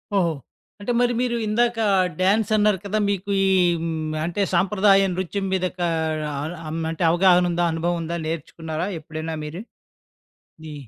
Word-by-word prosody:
ఓహో! 175 -4 +2 0.5
అంటే 205 +4 -3
మరి 245 0 +2
మీరు 245 -1 0
ఇందాక 235 +2 +1 0.4
డాన్సన్నారు 210 +1 +3
కదా! 205 +2 -1
మీకు 200 0 -2
ఈ - - +3 0.8
అంటే 175 +4 -2
సాంప్రదాయ 195 +2 +4
నృత్యం 190 +2 -3
మీద 185 -1 +1
కా 175 - +1 0.5
ఆహ్, 150 +5 -4
అం 160 - -4
అంటే 165 +2 -3
అవగాహన 180 0 +4
ఉందా? 175 0 0
అనుభవం 170 +2 -1
ఉందా? 170 +1 -3
నేర్చుకున్నారా 160 +1 -4
ఎప్పుడైనా 160 +1 -6
మీరు? 160 +5 -6 1.0
నీ 155 -1 -7
185 Hz, 140 wpm, -23 LUFS, 165-205 Hz, 1.0 s, సాంప్రదాయ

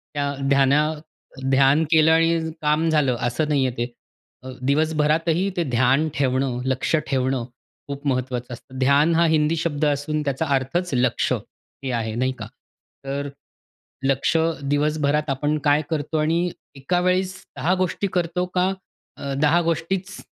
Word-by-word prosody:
त्या 145 -1 0 0.2
ध्याना 140 +1 +4 0.7
ध्यान 135 +3 +4
केलं 160 -1 +5
आणि 165 +1 +3 0.2
काम 155 +2 +2
झालं 150 -5 +2
असं 150 +6 -1
नाही 140 -3 +2
आहे 125 -1 -3
ते. 120 +1 -1 0.6
अ, 130 - -8
दिवसभरातही 155 +5 +1
ते 175 - +2
ध्यान 130 +6 +3
ठेवणं, 130 -2 0
लक्ष 130 +4 0
ठेवणं 130 -2 0 0.4
खूप 140 0 -5
महत्वाचं 125 -2 -2
असतं. 130 +2 -11
ध्यान 140 +5 +4
हा 170 +1 +4
हिंदी 150 +1 +2
शब्द 155 -2 -1
असून 150 +1 0
त्याचा 140 +2 -1
अर्थच, 155 +7 -1
लक्ष 125 0 +1
हे 135 -1 -8
आहे 115 -2 -2
नाही 130 +2 0
का? 105 - -6 0.6
तर 140 +1 -3 0.8
लक्ष 135 +3 +1 0.4
दिवसभरात 150 0 +1
आपण 145 +3 0
काय 145 0 +4
करतो 155 0 -2
आणि 165 +3 +1 0.3
एका 140 +7 -1
वेळेस 185 +1 +1 0.2
10 175 +4 +1
गोष्टी 185 +2 -1
करतो 180 0 0
का 185 +1 +2 0.5
अ, 140 -1 -4
10 155 +3 +4
गोष्टीच 170 +4 -2
150 Hz, 145 wpm, -23 LUFS, 135-160 Hz, 0.8 s, केलं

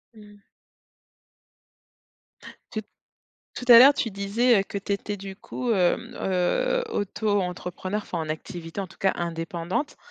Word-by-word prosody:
Mmh. 205 -1 -15 2.3
Tout 215 - -3 0.7
tout 250 - -6
à 230 - +12
l'heure, 275 +4 +9
tu 230 - -1
disais 200 +3 +2
que 200 - -6
tu 200 0 -2
étais, 205 +1 -4
du 195 0 -8
coup, 240 +4 -4
hem, 180 -4 +1
heu, - - +1
auto-entrepreneur, 200 - -2
enfin 175 - -4
en 160 -1 -4
activité, 165 +3 -6
en 195 - -3
tout - - -18
cas, 190 - +2
indépendante. 170 - -3
200 Hz, 130 wpm, -25 LUFS, 180-215 Hz, 2.3 s, à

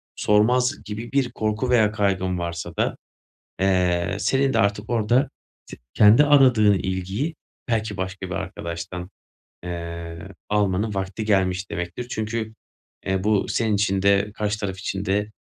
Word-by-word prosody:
sormaz." 125 +6 +2
gibi 110 +3 -6
bir 135 -3 +1
korku 110 +3 -1
veya 110 -4 +4
kaygın 95 -4 0
varsa 85 -1 -5
da, - - 0 0.7
eee, 90 -1 +1
senin 135 +3 +2
de - - +1
artık 100 +2 0
orada, 120 +4 +2 0.4
t - - -10 0.2
kendi 110 +7 +7
aradığın 125 -8 +5
ilgiyi 95 - -2 0.3
belki 110 -3 -1
başka 95 0 -4
bir - - -3
arkadaştan, 85 +2 -5 0.5
eee, 85 -1 -6 0.3
almanın 105 0 +1
vakti 95 +3 -3
gelmiş 95 -2 +1
demektir. 90 +7 -4
Çünkü, 110 0 -3 0.5
eee, 95 0 0
bu 105 -2 +2
senin 110 -3 +1
için 100 -1 +1
de 100 +1 +3
karşı 105 -1 -2
taraf 95 -2 -3
için 95 0 -3
de 105 +2 0
105 Hz, 140 wpm, -23 LUFS, 95-110 Hz, 0.7 s, kendi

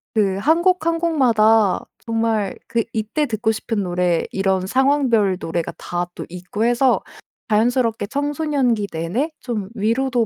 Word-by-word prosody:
그 195 -3 +2
1 320 +11 +3
곡, 365 -3 +2
1 335 0 +2
곡마다 225 - +3
정말 225 -3 -1
그 230 -1 0
이때 225 +8 -1
듣고 220 -1 0
싶은 220 -1 -2
노래 175 -2 0
이런 190 -1 0
상황별 255 -5 +2
노래가 165 -1 -3
다 175 0 -3
또 - - -6
있고 180 +5 -3
해서 245 +2 +3 0.5
자연스럽게 225 0 +1
청소년기 285 -5 0
내내 175 - -2
좀 215 -6 -4
위로도 235 +3 +1
225 Hz, 265 characters per minute, -20 LUFS, 195-265 Hz, 0.5 s, 1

